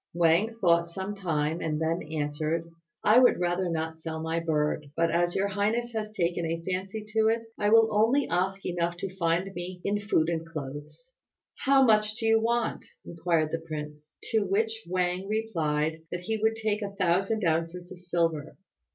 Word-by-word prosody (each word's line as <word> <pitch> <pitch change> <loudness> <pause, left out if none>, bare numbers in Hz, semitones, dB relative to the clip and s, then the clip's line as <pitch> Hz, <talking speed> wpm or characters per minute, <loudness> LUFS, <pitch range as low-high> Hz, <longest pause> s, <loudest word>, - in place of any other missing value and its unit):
Wang 175 +7 +3
thought 170 -3 +3
some 190 +4 -4
time, 165 -5 -1
and 155 -1 -1
then 160 +2 0
answered, 155 +2 -2 0.3
"I 220 +4 +7
would 255 - +5
rather 175 +1 0
not 160 -1 -3
sell 160 0 -5
my 160 +1 -1
bird; 150 -2 -1
but 165 -1 +2
as 175 +1 +1
your 200 +1 +1
highness 220 +4 -1
has 215 -1 -3
taken 175 -4 -1
a 165 0 -2
fancy 195 +3 -3
to 220 0 +2
it 225 +1 +1 0.2
I 205 - +2
will 225 0 +6
only 240 +6 +3
ask 190 +2 -1
enough 175 -1 -1
to 190 0 -5
find 175 +2 0
me 180 0 -6
in 205 +1 +1
food 180 -6 +2
and 165 -1 -1
clothes." 150 - -8 0.5
"How 270 0 +6
much 215 -2 +3
do 225 - -4
you 225 0 +4
want?" 235 0 0 0.2
inquired 165 -2 0
the 165 - -1
prince; 150 -2 -8
to 225 - +4
which 220 +3 0
Wang 180 +1 0
replied 160 -8 -1
that 175 - -3
he 220 +5 -2
would 220 +1 +1
take 215 -1 -1
a 200 -1 -5
thousand 195 +3 +1
ounces 165 +2 -1
of 185 - -10
silver. 165 -4 -1
175 Hz, 180 wpm, -28 LUFS, 165-215 Hz, 0.5 s, I